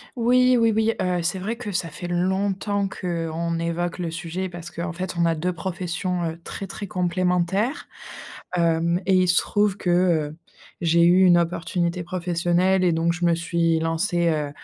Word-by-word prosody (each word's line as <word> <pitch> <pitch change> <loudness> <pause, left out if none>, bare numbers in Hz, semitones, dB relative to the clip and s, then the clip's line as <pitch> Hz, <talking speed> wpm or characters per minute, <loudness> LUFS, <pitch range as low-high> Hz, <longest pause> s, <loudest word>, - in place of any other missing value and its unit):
Oui 250 +1 +4
oui 230 -1 +3
oui, 220 +1 +2
heu, 180 -1 0
c'est 175 +3 -1
vrai 215 +5 -3
que 225 -3 -5
ça 175 -3 -1
fait 175 +4 -7
longtemps 195 +3 0
qu'on 170 -2 -3
évoque 170 +2 -2
le 170 -2 -2
sujet 175 +3 -4
parce 175 -1 -9
qu'en 175 +1 -4
fait 180 +1 -5
on 170 - +3
a 165 -1 +2
2 180 +3 -2
professions, 180 0 -3
heu, 165 - -11
très 195 - -6
très 200 +1 -7
complémentaires. 180 - 0 0.7
Hem 170 +1 +1
et 190 - +2
il 185 0 +3
se 180 - +3
trouve 205 -2 +1
que, 180 - -3
heu, 170 -4 +2 0.4
j'ai 170 0 +3
eu 180 +2 +6
une 175 -1 +6
opportunité 170 +1 -1
professionnelle 180 +1 +1
et 180 - +3
donc 165 +1 +1
je 175 0 -2
me 170 -1 +3
suis 165 -1 0
lancée, 170 +1 0
heu, 150 -2 -1
175 Hz, 180 wpm, -23 LUFS, 170-185 Hz, 0.7 s, eu